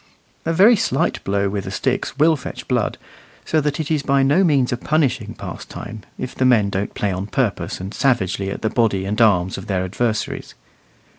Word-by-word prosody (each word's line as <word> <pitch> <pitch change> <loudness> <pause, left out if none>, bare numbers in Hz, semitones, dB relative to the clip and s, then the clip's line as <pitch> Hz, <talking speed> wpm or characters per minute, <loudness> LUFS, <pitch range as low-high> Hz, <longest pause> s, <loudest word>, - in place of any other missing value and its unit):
A - - +2
very 200 +8 +6
slight 200 - 0
blow 100 0 0
with 100 0 -3
the - - -4
sticks - - -2
will 160 +2 +5
fetch 140 - -8
blood, - - 0 0.5
so 155 - +2
that 145 0 -1
it 155 -1 -3
is 155 -2 +2
by 140 -1 +2
no 145 +8 +4
means 140 -8 +2
a - - -1
punishing 130 -7 0
pastime, 110 -1 -8 0.2
if 130 - -5
the - - -1
men 115 -6 +4
don't 95 +2 -3
play 105 - 0
on 95 +2 -3
purpose 125 -3 -1
and 95 +3 -6
savagely 100 -7 +1
at 100 - -6
the 110 - +2
body 105 -5 +1
and 105 +4 -1
arms 95 -5 +3
of - - -10
their 95 -3 0
adversaries. 110 +4 -2
120 Hz, 200 wpm, -21 LUFS, 100-145 Hz, 0.5 s, very